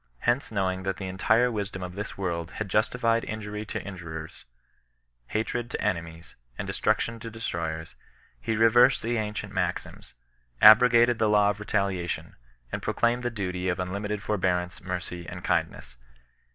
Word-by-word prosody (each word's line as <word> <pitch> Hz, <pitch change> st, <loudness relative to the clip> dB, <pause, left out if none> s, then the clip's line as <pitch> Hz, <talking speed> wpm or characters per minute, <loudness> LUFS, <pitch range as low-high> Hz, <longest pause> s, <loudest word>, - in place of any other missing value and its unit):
Hence 120 Hz, +2 st, +1 dB
knowing 95 Hz, -3 st, 0 dB
that 95 Hz, 0 st, -2 dB
the 95 Hz, -, -5 dB
entire 110 Hz, +6 st, +2 dB
wisdom 100 Hz, -4 st, -4 dB
of 90 Hz, 0 st, -6 dB
this 105 Hz, +2 st, -6 dB
world 85 Hz, -4 st, -2 dB
had 110 Hz, -1 st, -4 dB
justified 115 Hz, +3 st, +2 dB
injury 105 Hz, -1 st, -5 dB
to -, -, -5 dB
in 100 Hz, -, -6 dB
jurers, 80 Hz, -2 st, -8 dB, 0.8 s
hatred 120 Hz, -, -2 dB
to -, -, -4 dB
enemies, 85 Hz, -1 st, -3 dB, 0.2 s
and -, -, -3 dB
destruction 115 Hz, 0 st, 0 dB
to 115 Hz, 0 st, -7 dB
destroyers, 85 Hz, -7 st, -4 dB, 0.4 s
he 110 Hz, -, -1 dB
reversed 120 Hz, +4 st, +5 dB
the 120 Hz, +1 st, 0 dB
ancient 105 Hz, -1 st, -3 dB
maxims, 90 Hz, -2 st, -3 dB, 0.4 s
abrogated 120 Hz, +2 st, +7 dB
the 110 Hz, -, +3 dB
law 105 Hz, -1 st, +4 dB
of 105 Hz, -, -8 dB
re 105 Hz, -, -7 dB
' -, -, -21 dB
taliation, 100 Hz, -4 st, -1 dB, 0.4 s
and -, -, -3 dB
proclaimed 120 Hz, +1 st, +1 dB
the 120 Hz, -, -1 dB
duty 90 Hz, -4 st, -3 dB
of 90 Hz, -, -1 dB
unlimited 100 Hz, +3 st, -3 dB
forbear 95 Hz, -4 st, +1 dB
ance, 90 Hz, +1 st, -8 dB
mercy, 90 Hz, -1 st, -5 dB
and -, -, -8 dB
kindness. 60 Hz, -, -1 dB
100 Hz, 165 wpm, -27 LUFS, 90-115 Hz, 0.8 s, abrogated